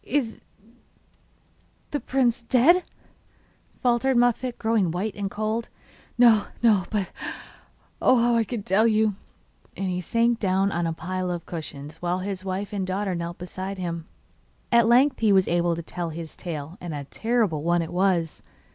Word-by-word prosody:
'Is 250 -5 -1 1.5
the 290 - -1
prince 250 -4 +1
dead?' 265 +10 +4 1.0
faltered 250 +1 +2
Muffette, 245 +1 +2
growing 220 -5 +1
white 185 +6 -2
and 200 -1 -3
cold. 215 +3 -2 0.5
'No, 230 -4 +6 0.2
no; 210 -5 +4
but 205 -4 -2 0.9
oh, 255 - +5
how 235 -1 +3
can 225 0 -4
I - - -14
tell 205 +5 +3
you!' 215 -1 +3 0.6
And 195 -1 -2
he 180 0 -2
sank 230 +4 +1
down 195 0 +1
on 170 -1 -1
a - - -1
pile 185 +2 -3
of 175 -2 -4
cushions 150 -2 -7
while 175 +1 -1
his 190 0 -4
wife 195 +2 -4
and 195 -2 -2
daughter 190 +1 -1
knelt 170 0 -4
beside 185 +2 -6
him. 170 -3 -4 0.6
At 235 -1 +5
length 255 +3 +4
he 220 -2 +3
was 190 -1 +4
able 175 0 +1
to 170 - -6
tell 170 +1 -4
his 160 0 -7
tale, 160 +1 -6
and 170 -3 -5
a 145 - -4
terrible 220 - 0
one 170 +1 +2
it 165 - -7
was! 180 -3 +1
195 Hz, 165 wpm, -25 LUFS, 175-230 Hz, 1.5 s, No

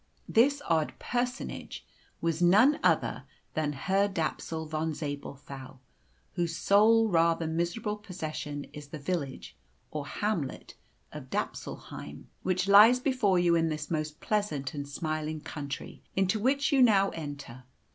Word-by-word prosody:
This 280 +5 +3
odd 160 -2 +1
personage 250 +1 -3 0.4
was 165 0 0
none 210 +12 +5
other - - +1 0.3
than 150 -2 -1
Herr 195 +8 +1
Dapsul 160 -2 -3
Von 155 0 -2
Zabelthau, 140 -2 -7 0.6
whose 170 -2 -1
sole 220 +6 +5
rather 165 -3 +2
miserable 175 +7 -2
possession 155 -7 -5
is 150 -1 -9
the 155 - -7
village, 145 -3 -4 0.4
or 150 -2 -4
hamlet, 170 -4 -3 0.4
of - - -8
Dapsulheim, - - -5
which 185 0 0
lies 215 +5 +8
before 250 -8 +2
you 175 -1 +3
in 165 -1 +2
this 150 0 -4
most 155 -1 -2
pleasant 200 -11 -1
and 145 -1 -5
smiling 155 +1 -3
country 145 -1 -7
into 195 +3 +2
which 275 +5 +2
you 275 -2 +4
now 200 -5 +5
enter. 140 -5 -8
165 Hz, 130 wpm, -29 LUFS, 150-205 Hz, 0.6 s, lies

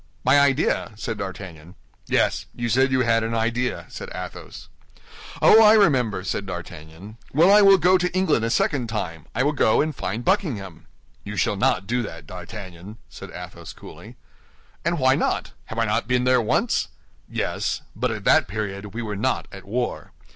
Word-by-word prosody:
"My 130 +3 +5
idea?" 140 -4 +1
said 110 0 -5
D'Artagnan. 90 -4 -8 0.3
"Yes; - - +1
you 120 -1 -3
said 130 +3 +3
you 130 0 +2
had 115 -2 +2
an 115 +1 -2
idea," 120 +2 -1
said - - -8
Athos. - - -8 0.8
"Oh, 220 - +8
I 215 -1 +8
remember," 125 - +2
said 100 +1 -3
D'Artagnan. 90 +3 -9 0.2
"Well, 165 +7 +5
I 210 - +7
will 195 -1 +7
go 180 +2 +4
to 180 0 0
England 185 -10 +1
a 115 - 0
second 125 0 0
time; 90 -8 -5
I 125 - +2
will 145 - +2
go 110 -6 +3
and 155 -1 0
find 110 +3 -4
Buckingham." 120 - -1 0.4
"You 105 +1 -6
shall 95 - +1
not 105 -1 +1
do 120 +4 0
that, 85 -9 -8
D'Artagnan," 95 +2 -9
said - - -10
Athos, - - -9
coolly. - - -13 0.7
"And 170 0 0
why 130 -2 +4
not? - - -1
Have - - -8
I - - +2
not - - -1
been 125 0 +1
there 125 -1 +3
once?" 110 - 0 0.4
"Yes; - - -2
but - - -1
at - - -5
that - - +4
period 100 0 -5
we 120 - -3
were 105 -2 -4
not 130 +6 -1
at 95 -1 -11
war. 120 +4 -3
115 Hz, 180 wpm, -23 LUFS, 100-135 Hz, 0.8 s, Oh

